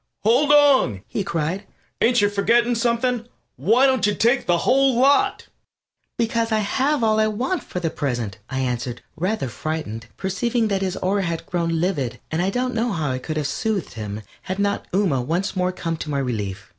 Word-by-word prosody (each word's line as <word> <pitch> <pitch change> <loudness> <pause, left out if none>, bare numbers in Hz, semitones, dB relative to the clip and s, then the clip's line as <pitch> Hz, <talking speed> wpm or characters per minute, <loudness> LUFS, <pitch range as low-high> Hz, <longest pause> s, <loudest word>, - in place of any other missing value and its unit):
"Hold 255 +7 +4
on!" 270 - +5
he 205 - -2
cried. 175 +3 -2 0.3
"Ain't 240 -1 +4
you 205 - +3
forgetting 235 +4 +3
something? 235 0 0 0.3
Why 220 - +3
don't 260 -5 +3
you 205 - +1
take 240 +3 +2
the 175 - +3
whole 265 +7 +3
lot?" 285 +10 +3 0.7
"Because 230 0 0
I 220 - +3
have 260 +6 +1
all 220 -1 +3
I 215 - +4
want 255 - -1
for 180 - -5
the 165 -3 -2
present," 120 -8 -3
I 130 0 -2
answered, 125 -1 -3
rather 180 -2 -1
frightened, 120 -5 -5
perceiving 225 +4 0
that 195 -1 0
his 190 -1 -2
aura 195 +2 0
had 170 -3 -3
grown 165 -2 -1
livid, 160 -9 -1
and 160 +2 0
I 185 - +1
don't 250 +4 -1
know 230 +1 0
how 155 -7 -1
I 130 - -2
could 155 +4 -4
have 150 - -1
soothed 205 +6 -2
him 105 -1 -6 0.2
had 185 0 -4
not 200 0 -1
Ooma 175 -10 +1
once 175 +9 -1
more 185 0 +1
come 165 -3 -3
to 155 - -6
my 145 - -1
relief. 105 -7 -3
195 Hz, 195 wpm, -22 LUFS, 155-235 Hz, 0.7 s, on